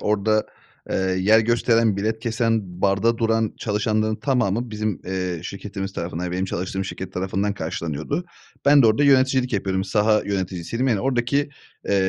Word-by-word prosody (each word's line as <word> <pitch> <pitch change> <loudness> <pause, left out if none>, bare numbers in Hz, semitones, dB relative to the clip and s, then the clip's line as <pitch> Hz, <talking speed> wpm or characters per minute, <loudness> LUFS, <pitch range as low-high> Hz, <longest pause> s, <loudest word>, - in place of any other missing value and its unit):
orada, 105 +1 +1 0.4
eee, - - 0
yer 95 +4 +3
gösteren, 115 -2 +2
bilet 110 +2 -1
kesen, 110 -5 -1
barda 100 +4 +2
duran 115 -1 +1
çalışanların 110 0 0
tamamı 120 -3 0
bizim, 105 -2 -2
eee, 90 -2 -3
şirketimiz 95 0 -6
tarafından, 85 0 -4
yani, 90 - -4
benim 95 +1 -1
çalıştığım 95 +1 -3
şirket 95 0 -6
tarafından 95 +2 -1
karşılanıyordu. 80 - -3 0.4
Ben 140 -1 +7
de - - +6
orada 110 +7 +3
yöneticilik 130 -2 +3
yapıyordum. 95 -2 -1
Saha 105 +2 +2
yöneticisiydim, 95 +5 -2
yani, 110 -5 +1
oradaki, 135 +3 0 0.4
eee, 100 - +2
105 Hz, 150 wpm, -23 LUFS, 95-115 Hz, 0.4 s, Ben